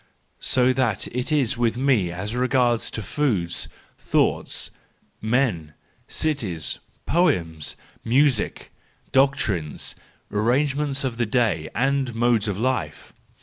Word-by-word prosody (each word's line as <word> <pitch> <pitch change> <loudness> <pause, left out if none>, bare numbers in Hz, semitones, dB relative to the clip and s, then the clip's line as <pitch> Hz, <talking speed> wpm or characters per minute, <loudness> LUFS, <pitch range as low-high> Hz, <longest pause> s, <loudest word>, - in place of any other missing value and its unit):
So 125 -1 +2 0.5
it 125 +5 -2
is 140 -7 +2
with 115 -1 +1
me 125 -9 +2
as 100 +6 -4
regards 125 -2 +2
foods, 105 - -1 0.3
thoughts, - - 0 0.5
men, 110 - 0 0.3
cities, 110 - -1 0.3
poems, 85 - +1 0.3
music, 130 0 +1 0.4
doctrines, 110 - +1 0.4
arrangements 140 +6 +1
of 125 -4 -2
the 120 -2 0
day, 105 -10 +1
and 135 -1 +1
modes 115 -2 +2
of 100 -3 -2
life. 130 +3 -2
120 Hz, 100 wpm, -24 LUFS, 100-135 Hz, 0.5 s, So